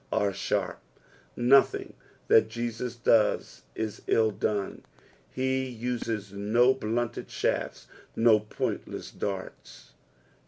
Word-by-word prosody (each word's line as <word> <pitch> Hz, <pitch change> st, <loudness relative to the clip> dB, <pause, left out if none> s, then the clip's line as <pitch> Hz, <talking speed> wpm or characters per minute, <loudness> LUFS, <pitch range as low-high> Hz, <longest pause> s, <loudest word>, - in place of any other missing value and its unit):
"Are 100 Hz, -1 st, +1 dB
tharp." -, -, -2 dB, 0.6 s
Kothinf; 130 Hz, +3 st, +4 dB, 0.3 s
th&t 110 Hz, -, +6 dB
Jesus 120 Hz, +1 st, -4 dB
does 115 Hz, -2 st, +2 dB
is 110 Hz, -2 st, -4 dB
ill 110 Hz, -1 st, +3 dB
done, 100 Hz, 0 st, -2 dB, 0.5 s
he 130 Hz, 0 st, 0 dB
uses 115 Hz, -4 st, -4 dB
no 115 Hz, +6 st, +3 dB
blunted 120 Hz, -1 st, -3 dB
shafts, -, -, -2 dB, 0.3 s
no 115 Hz, -2 st, +5 dB
pointless 105 Hz, 0 st, -4 dB
darts. 95 Hz, -2 st, -6 dB
115 Hz, 95 wpm, -28 LUFS, 105-120 Hz, 0.6 s, th&t